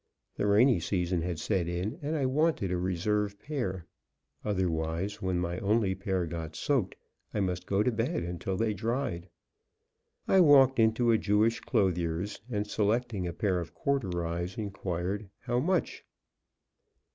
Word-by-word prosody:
The 105 Hz, -, 0 dB
rainy 105 Hz, +1 st, +5 dB
season 90 Hz, 0 st, 0 dB
had 85 Hz, 0 st, -2 dB
set 90 Hz, +2 st, 0 dB
in, 90 Hz, -, -3 dB
and 150 Hz, +2 st, -2 dB
I 140 Hz, -4 st, +1 dB
wanted 140 Hz, -, +1 dB
a 90 Hz, -, +1 dB
reserve 100 Hz, +3 st, 0 dB
pair. 105 Hz, -, -4 dB, 0.6 s
Otherwise, 90 Hz, -1 st, -1 dB
when 95 Hz, -1 st, 0 dB
my 90 Hz, 0 st, -2 dB
only 105 Hz, -1 st, +2 dB
pair 95 Hz, -1 st, -1 dB
got 80 Hz, -1 st, -6 dB
soaked 135 Hz, -10 st, 0 dB, 0.4 s
I -, -, +1 dB
must 90 Hz, -2 st, -2 dB
go 100 Hz, +1 st, +2 dB
to 125 Hz, -, +2 dB
bed 115 Hz, -, -1 dB
until 90 Hz, +2 st, -3 dB
they 110 Hz, 0 st, +1 dB
dried. 110 Hz, -5 st, -2 dB, 1.0 s
I 190 Hz, -, +5 dB
walked 135 Hz, -5 st, +6 dB
into 115 Hz, +1 st, +4 dB
a 110 Hz, -, +4 dB
Jewish 105 Hz, +3 st, +2 dB
clothier's, 90 Hz, 0 st, 0 dB
and, 105 Hz, -3 st, -1 dB
selecting 105 Hz, -1 st, 0 dB
a -, -, -2 dB
pair 95 Hz, -2 st, 0 dB
of 85 Hz, -, -7 dB
corduroys, 90 Hz, -9 st, -2 dB
inquired, 100 Hz, -1 st, -3 dB
"How 120 Hz, -1 st, 0 dB
much?" 180 Hz, +5 st, 0 dB
100 Hz, 145 wpm, -30 LUFS, 90-115 Hz, 1.0 s, walked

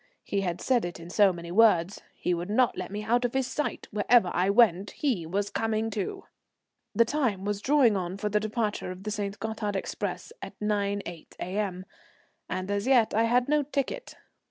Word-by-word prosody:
He 200 Hz, -, -1 dB
had 175 Hz, -3 st, -3 dB
said 250 Hz, -3 st, +2 dB
it 175 Hz, -1 st, -5 dB
in 170 Hz, +1 st, -9 dB
so 205 Hz, -1 st, +5 dB
many 170 Hz, -1 st, -8 dB
words. 195 Hz, -3 st, +4 dB
He 180 Hz, -, -1 dB
would 175 Hz, +2 st, -3 dB
not 240 Hz, +3 st, +3 dB
let 185 Hz, -, -5 dB
me 205 Hz, +2 st, -5 dB
out 240 Hz, +3 st, +2 dB
of 245 Hz, +1 st, -1 dB
his 265 Hz, -1 st, +2 dB
sight; 285 Hz, +3 st, -3 dB
wherever 210 Hz, -2 st, +3 dB
I 180 Hz, +2 st, +2 dB
went 200 Hz, -3 st, +4 dB
he 225 Hz, -, -1 dB
was 200 Hz, +4 st, -1 dB
coming 225 Hz, +1 st, -1 dB
too. 200 Hz, -3 st, -4 dB, 0.7 s
The 230 Hz, -, +5 dB
time 230 Hz, -9 st, -1 dB
was 205 Hz, 0 st, -2 dB
drawing 260 Hz, -4 st, +4 dB
on 185 Hz, 0 st, -3 dB
for 210 Hz, +1 st, -2 dB
the 210 Hz, 0 st, +2 dB
departure 215 Hz, -2 st, -2 dB
of 185 Hz, +1 st, -8 dB
the 215 Hz, -, -3 dB
St. 205 Hz, -1 st, -3 dB
Gothard 220 Hz, -2 st, -3 dB
express 195 Hz, -, -4 dB
at -, -, -9 dB
9.8 200 Hz, -5 st, -2 dB
A.M., 185 Hz, -1 st, -3 dB, 0.6 s
and 185 Hz, +2 st, -3 dB
as 205 Hz, +3 st, -1 dB
yet 245 Hz, -5 st, +4 dB
I 225 Hz, +2 st, +3 dB
had 245 Hz, +2 st, +2 dB
no 300 Hz, +1 st, +3 dB
ticket. 285 Hz, -, -3 dB
210 Hz, 195 wpm, -28 LUFS, 190-230 Hz, 0.7 s, so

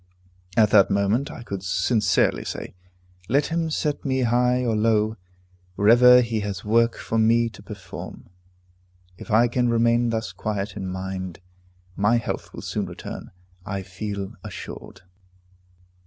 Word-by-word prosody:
At 105 Hz, -2 st, +5 dB
that 100 Hz, -2 st, +6 dB
moment 100 Hz, +7 st, +1 dB
I -, -, -9 dB
could 100 Hz, -5 st, -5 dB
sincerely 95 Hz, +2 st, +1 dB
say, -, -, -6 dB, 0.6 s
"Let 140 Hz, +4 st, +3 dB
him 165 Hz, -1 st, -1 dB
set 150 Hz, -1 st, -2 dB
me 130 Hz, -2 st, 0 dB
high 125 Hz, +1 st, +2 dB
or 115 Hz, -2 st, +1 dB
low, 110 Hz, 0 st, +2 dB, 0.6 s
wherever 125 Hz, +5 st, +7 dB
he 115 Hz, -2 st, -1 dB
has 100 Hz, -1 st, -5 dB
work 115 Hz, +2 st, +3 dB
for 115 Hz, -, -2 dB
me 115 Hz, +1 st, +3 dB
to 110 Hz, -, -14 dB
perform." 100 Hz, -3 st, -9 dB, 0.9 s
If -, -, -10 dB
I 115 Hz, +2 st, +4 dB
can 120 Hz, 0 st, 0 dB
remain 115 Hz, +1 st, +2 dB
thus 110 Hz, -4 st, -2 dB
quiet 100 Hz, +2 st, -4 dB
in 95 Hz, -2 st, -5 dB
mind, 95 Hz, -1 st, -5 dB, 0.6 s
my 105 Hz, +4 st, +3 dB
health 115 Hz, -, -4 dB
will -, -, -9 dB
soon -, -, -3 dB
return, -, -, -8 dB, 0.3 s
I 100 Hz, 0 st, -4 dB
feel 100 Hz, +2 st, -5 dB
assured. -, -, -9 dB
110 Hz, 140 wpm, -24 LUFS, 100-120 Hz, 0.9 s, wherever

